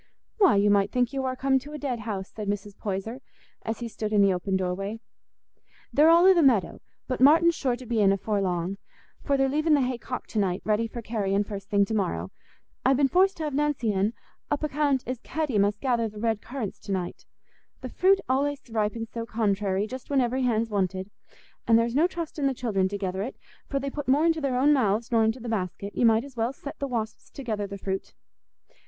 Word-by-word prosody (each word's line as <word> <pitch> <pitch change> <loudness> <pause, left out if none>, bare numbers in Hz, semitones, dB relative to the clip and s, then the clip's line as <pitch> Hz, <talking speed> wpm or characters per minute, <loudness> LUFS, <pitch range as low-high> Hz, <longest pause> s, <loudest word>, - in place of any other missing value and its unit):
"Why, 385 - +6
you 205 +1 +4
might 200 -1 +3
think 250 0 +1
you 270 - -1
war 260 -1 -2
come 265 +1 +2
to 290 +3 -11
a - - -4
dead 270 -5 -3
house," 205 -3 -4
said 210 -2 -6
Mrs. 205 0 -3
Poyser, 215 +5 -4 0.4
as 225 +2 -4
he 235 - -3
stood 215 -1 -4
in 205 -2 +4
the 195 -1 +4
open 190 +1 -1
doorway; 195 +4 -3 0.9
"they're 300 +3 +6
all 340 +2 +6
i' 380 - +8
the 345 - +3
meadow; 235 - +2 0.3
but 255 -1 -3
Martin's 330 +5 +6
sure 260 -6 -1
to 250 +1 -11
be 235 -1 -1
in 195 -1 +5
afore 200 +1 0
long, 180 +1 -2 0.4
for 280 -2 +1
they're 270 0 +3
leaving 305 +3 +2
the 285 - +2
hay 250 -1 -1
cocked 250 - -6
to 220 - 0
night, 185 -2 0
ready 215 +2 +1
for 235 +1 -8
carrying 205 -3 0
first 200 -1 -8
thing 200 -1 +3
to 220 - -4
morrow. 90 - -1 0.5
I've 265 0 +4
been 275 -1 +3
forced 380 +3 +3
t' 320 - -4
have 300 -2 -3
Nancy 280 -6 0
in, 200 +3 +1 0.4
upo' 295 +1 0
'count 280 -2 +1
as 255 -1 -4
Hetty 300 -9 -1
must 205 +1 +2
gether 235 -4 +1
the 210 - -13
red 220 -1 -1
currants 245 -6 -5
to 200 - -8
night; 185 -2 -4 0.5
the - - -6
fruit 385 +1 +3
allays 280 +2 0
ripens 225 +1 -2
so 230 -1 -5
contrairy, 205 -3 0
just 255 +3 -8
when 280 -2 +2
every 255 +1 +1
hand's 230 -3 +1
wanted. 190 0 -1 0.6
An' 230 - +5
there's 230 +1 +2
no 310 +6 +4
trustin' 325 -5 -3
the 270 - -1
children 205 -7 0
to 200 +1 -4
gether 190 -1 -3
it, 240 +6 -4 0.3
for 275 - -2
they 275 0 -4
put 290 0 -5
more 285 +5 +4
into 325 -1 +2
their 265 -3 0
own 285 +4 +5
mouths 230 -3 +1
nor 225 -1 +4
into 220 +3 0
the 240 - -7
basket; 200 -2 -3
you 240 - +4
might 225 +1 +4
as 275 -2 -12
well 230 +1 0
set 280 +1 -9
the 280 - -2
wasps 225 -4 -4
to 275 - -9
gether 210 -4 -2
the 200 0 -7
fruit." 190 0 -4
230 Hz, 230 wpm, -26 LUFS, 205-270 Hz, 0.9 s, i